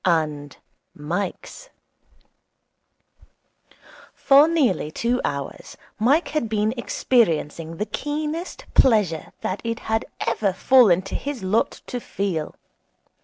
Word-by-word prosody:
And 150 -4 0 0.4
Mike's 180 - -5 2.5
For 280 +2 +6
nearly 275 - +1
two 240 +9 -1
hours 140 -1 -5 0.2
Mike 275 +10 +3
had 270 -8 -2
been 215 0 0
experiencing 165 - 0
the 210 - -1
keenest 305 +7 -4
pleasure 210 -11 +3
that 190 - -3
it 230 0 -3
had 220 0 -1 0.2
ever 220 -4 0
fallen 200 -5 +5
to 195 - -9
his 280 -7 -4
lot 200 +4 0
to 245 - -4
feel. 190 -9 -3
215 Hz, 105 wpm, -23 LUFS, 170-260 Hz, 2.5 s, For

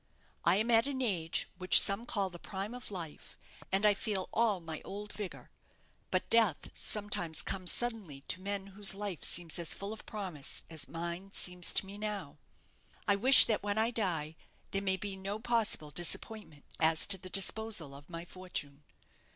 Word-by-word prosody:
I - - +4
am 220 +4 +1
at 230 +3 +4
an 275 -2 -3
age 180 -10 0
which 185 0 +8
some 200 +4 0
call 195 -5 -1
the 175 - -11
prime 195 +5 -5
of 250 0 -8
life, 170 -6 -8 0.3
and 195 +2 +1
I 210 - +6
feel 200 -2 -1
all 220 -4 +2
my 160 -2 -7
old 205 +1 -7
vigour. 205 -3 -8 0.6
But - - -1
death 225 -9 +3
sometimes 200 -6 -2
comes 185 -2 0
suddenly 215 - -2
to 185 - -3
men 200 0 -4
whose 200 -1 0
life 200 -6 -5
seems 170 -1 +1
as 170 - -1
full 200 +2 -5
of 220 - -10
promise 185 -9 -5
as 155 -4 -6
mine 170 +5 -5
seems 180 -1 +2
to - - +1
me 200 +2 -10
now. 200 -9 -5 0.7
I 200 - +4
wish 255 +7 +11
that 220 - 0
when 205 +1 -2
I 225 +2 +2
die 165 -9 -1 0.4
there 195 - -1
may 190 -1 0
be 200 0 -5
no 195 +2 -4
possible 225 -10 0
disappointment 175 -1 -3
as 160 0 +4
to 195 -2 +3
the 185 0 -8
disposal 195 -5 0
of 140 +1 -13
my 170 0 -7
fortune. 170 -6 -6
195 Hz, 180 wpm, -32 LUFS, 170-210 Hz, 0.7 s, wish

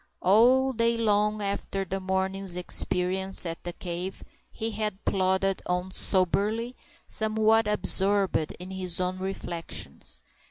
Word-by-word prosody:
All 250 +7 +4
day 230 0 +2
long 210 -1 +1
after 200 -1 -3
the 195 +2 -3
morning's 190 0 +1
experience 180 +1 +1
at 165 -1 -6
the 175 - -4
cave, 180 +2 -6 0.3
he 225 +1 -4
had 210 -2 -4
plodded 190 0 +1
on 180 +1 -2
soberly, 210 +7 +1 0.3
somewhat 220 0 +2
absorbed 200 -5 +2
in 180 +2 -9
his 185 -2 -4
own 185 0 -2
reflections. 185 -3 -2
195 Hz, 120 wpm, -27 LUFS, 185-215 Hz, 0.3 s, All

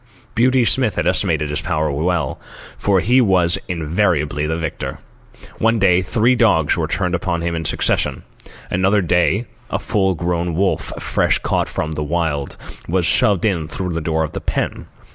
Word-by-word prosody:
Beauty 125 +1 +3
Smith 110 +2 +3
had - - -1
estimated 75 -2 +1
his 75 - -1
powers 75 -1 -1
well, 80 -1 -1 0.4
for 95 -3 +1
he 125 +3 +4
was 90 -6 +3
invariably 80 -3 0
the 80 +1 -1
victor. 80 -3 -4 0.6
One 115 +1 +2
day, 95 -3 +3
three 110 +7 +2
dogs 105 -11 +3
were - - -1
turned 90 -2 -1
in - - +2
upon 85 -1 -2
him 85 0 -2
in 80 -1 -3
succession. - - 0 0.5
Another 95 +3 +2
day 90 +6 +1 0.2
a - - -1
full 95 -4 0
grown 85 0 -2
wolf, 95 +3 0
fresh - - +1
caught - - -1
from 75 - -3
the 75 - -4
Wild, 75 -3 -2 0.3
was 90 0 0
shoved 95 +4 +3
in 85 -7 0
through 90 +4 -4
the 85 0 -2
door 80 0 0
of 80 - -4
the - - -6
pen. - - -3
90 Hz, 175 wpm, -19 LUFS, 80-100 Hz, 0.6 s, he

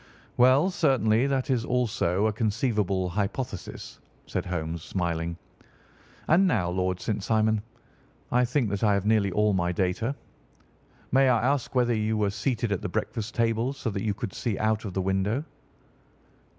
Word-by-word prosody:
"Well, 130 +8 +5
certainly 125 - +2
that 135 -1 0
is 120 -3 +1
also 110 -6 0
a 110 - +1
conceivable 105 -4 0
hypothesis," 100 +2 -4 0.3
said - - -3
Holmes, 85 -2 -3
smiling. 85 -1 -2 0.9
"And 185 +5 +5
now, 95 - +1
Lord 90 0 -1
St. 105 -2 -2
Simon, 110 -1 +2 0.7
I 125 +1 +4
think 125 -4 0
that 100 +1 -2
I 105 -2 +4
have 100 0 -1
nearly 105 -3 +3
all 105 +3 +2
my 90 -2 +1
data. 95 +9 -1 1.0
May 135 +1 +5
I 120 -2 +2
ask 140 -2 -1
whether 120 -1 +3
you 110 0 0
were 105 -2 +1
seated 115 +2 -1
at 100 - -1
the - - -3
breakfast 110 -1 -3
table 115 +2 +1
so 130 -5 -4
that 100 -1 -3
you 105 -2 -1
could 100 -3 -5
see 115 -5 -2
out 110 0 0
of 95 - -6
the 95 - +1
window?" 95 +8 0
110 Hz, 165 wpm, -27 LUFS, 95-125 Hz, 1.0 s, Well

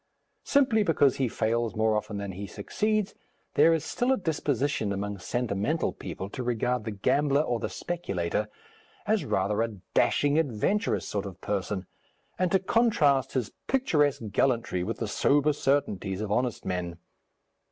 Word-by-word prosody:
Simply 260 -6 +3
because 150 -8 +3
he 130 - +1
fails 115 0 -1
more 110 0 +2
often 105 -1 -3
than 100 -1 -4
he 100 +2 -6
succeeds, 215 - -1 0.4
there 155 +3 +6
is 160 -1 +1
still 245 +2 0
a 265 - +3
disposition 145 - -1
among 100 0 -3
sentimental 120 - -1
people 95 - -6
to 130 - -5
regard 125 -1 -1
the 110 - -3
gambler 140 +8 +2
or 120 -5 -1
the - - -3
speculator 105 - -2 0.6
as - - +1
rather 100 +3 0
a 115 -2 -2 0.2
dashing, 145 +2 +3
adventurous 160 - 0
sort 100 -1 -3
of 95 -1 -10
person, 95 -1 -2 0.5
and 185 -1 +1
to 190 - +5
contrast 185 - +2
his 125 -5 -1 0.2
picturesque 150 - +2
gallantry 115 -6 +1
with 110 +5 -3
the 115 - -3
sober 145 +7 +3
certainties 105 -10 0
of 105 -1 -3
honest 125 +1 0
men. 90 -2 -3
125 Hz, 150 wpm, -28 LUFS, 105-150 Hz, 0.6 s, there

